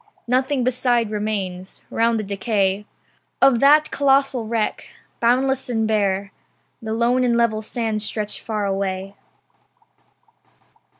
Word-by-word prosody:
Nothing 260 +2 +1
beside 245 -3 +1
remains. 195 -3 -4
Round 230 0 +1
the - - -3
decay 200 0 -1 0.5
Of 270 -3 +5
that 300 +3 +5
colossal 275 -4 +2
wreck, 225 -1 -2 0.3
boundless 260 +3 +1
and 225 -2 0
bare 200 -2 0 0.5
The 220 0 -3
lone 240 +2 +2
and 240 -1 +2
level 230 -2 +1
sands 220 -1 -3
stretch 210 0 -3
far 215 -2 -3
away. 195 0 -3
225 Hz, 115 wpm, -21 LUFS, 205-250 Hz, 0.5 s, Of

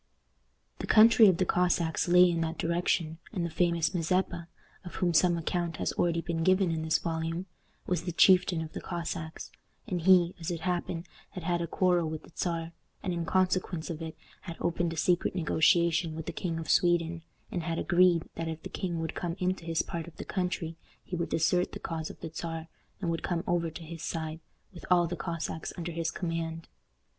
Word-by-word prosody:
The - - -4
country 225 0 +8
of 185 -3 +4
the 185 - +2
Cossacks 175 -2 +1
lay 180 +1 +7
in 165 -1 -1
that 160 0 -2
direction, 165 -1 0
and 180 -5 -2
the 170 - -4
famous 170 0 +1
Mazeppa, 175 0 0 0.4
of 175 - -9
whom 175 -2 +1
some 175 +1 +4
account 170 0 -2
has - - -1
already 170 -1 +1
been 165 -1 -2
given 185 0 +3
in 160 -1 -1
this 160 0 +2
volume, 165 +1 -3 0.4
was 180 -2 0
the 175 +1 -3
chieftain 180 -1 +5
of 160 - -9
the - - -5
Cossacks, 165 -2 -5 0.3
and 180 -7 -2
he, 180 0 +5
as 165 - -4
it 170 -2 -3
happened, 175 0 -2 0.3
had 180 - -6
had 175 0 0
a 170 - -2
quarrel 175 -2 +2
with 155 -1 -5
the - - -16
Czar, 165 -2 -2 0.3
and 185 -3 -1
in 170 -1 -2
consequence 185 -1 0
of 160 0 -6
it 160 -1 -6 0.2
had 170 -2 -8
opened 170 0 0
a 165 - -6
secret 175 +3 +1
negotiation 170 0 +3
with 160 -1 -5
the - - -3
King 170 -3 -3
of 165 -2 -5
Sweden, 170 -1 +2 0.3
and 175 - -2
had 165 0 -2
agreed 175 -2 +3
that 165 - -4
if 160 -1 -5
the - - -6
king 175 -3 -3
would 160 - -3
come 170 -1 -3
into 185 -2 -1
his 165 -1 0
part 170 -1 -5
of 170 - -13
the - - -6
country 180 -3 -2 0.3
he 180 - -5
would 170 -1 -2
desert 175 +2 +1
the - - -6
cause 160 -2 -4
of - - -11
the 160 - -6
Czar, 165 0 -5 0.3
and 170 -3 0
would 165 - -2
come 170 -1 -1
over 170 -1 +1
to 160 +2 -9
his 165 0 -8
side, 160 -1 -4 0.3
with 175 - -11
all 175 -1 +5
the 175 +1 -3
Cossacks 165 -1 -4
under 170 0 -4
his 165 0 -1
command. 165 -2 -4
170 Hz, 205 wpm, -29 LUFS, 165-180 Hz, 0.4 s, country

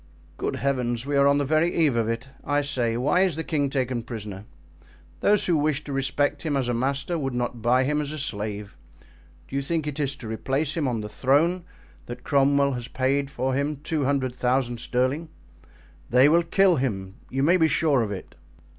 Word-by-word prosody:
"Good - - -2
heavens! 125 -3 -1
we 145 0 -1
are 140 0 +5
on 140 0 +4
the 145 - +1
very 155 +4 +2
eve 140 -5 +2
of 115 -1 +1
it. 115 +4 -3
I 145 0 +1
say, 120 -5 -1
why 135 +8 +2
is 185 -5 +2
the 160 - -3
king 145 -4 0
taken 130 -3 -1
prisoner? 105 -4 -7 0.7
Those 210 - +3
who 175 - +2
wish 150 -1 0
to 145 - -6
respect 145 +1 0
him 150 -4 -1
as 130 -3 -1
a 120 - 0
master 140 +7 -1
would 135 -3 -3
not 120 -1 -3
buy 125 +3 +3
him 150 +3 0
as 145 -1 -4
a 155 - -5
slave. 105 -6 -4 0.7
Do - - -8
you 140 - +1
think 160 +2 -2
it 150 0 -4
is 140 -1 -1
to 125 -4 -9
replace 135 +7 -1
him 155 -5 0
on 120 -3 -1
the 105 - -5
throne 160 - +1 0.4
that 120 - -8
Cromwell 140 0 +3
has 120 -1 -5
paid 135 +1 0
for 130 -1 -2
him 140 +3 0
two 155 -2 -1
hundred 130 -2 0
thousand 125 -1 0
pounds - - -6
sterling? 130 +6 0 0.8
They 125 +4 +6
will 165 +3 +5
kill 180 +1 +3
him, 95 -8 -3
you 135 +1 -1
may 170 +5 +5
be 160 -2 +4
sure 150 -5 +2
of 105 -3 -2
it." 95 -3 -7
135 Hz, 210 wpm, -25 LUFS, 120-150 Hz, 0.8 s, They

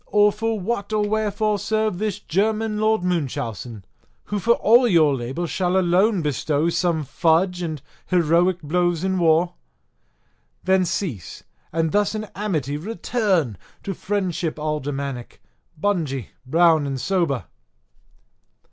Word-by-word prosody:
or 210 0 +4
for 225 +1 -2
what 200 +1 -3
or 210 -1 +1
wherefore 215 0 0
serve 215 -4 -1
this 210 -2 -1
German 215 +3 -1
Lord 215 -2 +2
Munchausen, 120 - -3 0.4
who 205 - -3
for 235 +5 +4
all 240 +3 +5
your 160 -8 +4
labour 130 +7 -3
shall 180 +2 0
alone 185 +1 +3
bestow 150 +3 0
some 170 -2 0
fudge 170 +5 +1
and 155 -5 -4 0.2
heroic 175 0 +2
blows 175 +2 0
in 190 -1 0
war? 170 +1 +3 1.1
Then 190 0 +3
cease, 155 - -4 0.3
and 165 -1 0
thus 205 +1 +1
in 215 - -3
amity 155 -9 -2
return 190 - -1 0.2
to 195 - -3
friendship 180 -5 -2
aldermanic, 140 -4 -4 0.4
bungy, 155 - -1 0.2
brown, 160 0 +4
and 135 -1 -3
sober." 160 - 0
175 Hz, 125 wpm, -22 LUFS, 155-205 Hz, 1.1 s, all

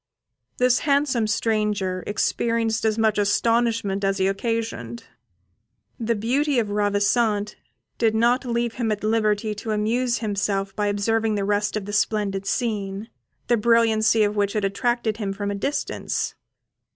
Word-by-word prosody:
This 250 0 +3
handsome 280 -6 +1
stranger 210 -4 0
experienced 225 +1 0
as 220 0 +1
much 220 -2 +2
astonishment 220 -1 +1
as 195 0 +1
he 190 - +1
occasioned. 195 - -3 1.0
The 230 0 0
beauty 265 +7 0
of 215 -3 0
Ravissante 205 +1 +1 0.5
did 225 -2 +2
not 240 +4 +3
leave 235 -2 -1
him 235 -3 -1
at 210 -1 -3
liberty 215 -1 +1
to 210 +2 -7
amuse 235 +4 0
himself 200 -2 -2
by 210 -1 0
observing 220 +2 0
the 200 -1 -1
rest 210 +1 0
of 205 - -5
the 205 - -6
splendid 200 -2 0
scene, 205 -1 -2 0.3
the 240 - +2
brilliancy 225 -1 +3
of 205 0 0
which 200 -1 0
had 210 -2 0
attracted 225 +2 -1
him 200 -3 -3
from 200 +1 -3
a - - -2
distance. 275 +9 -2
215 Hz, 145 wpm, -23 LUFS, 205-230 Hz, 1.0 s, This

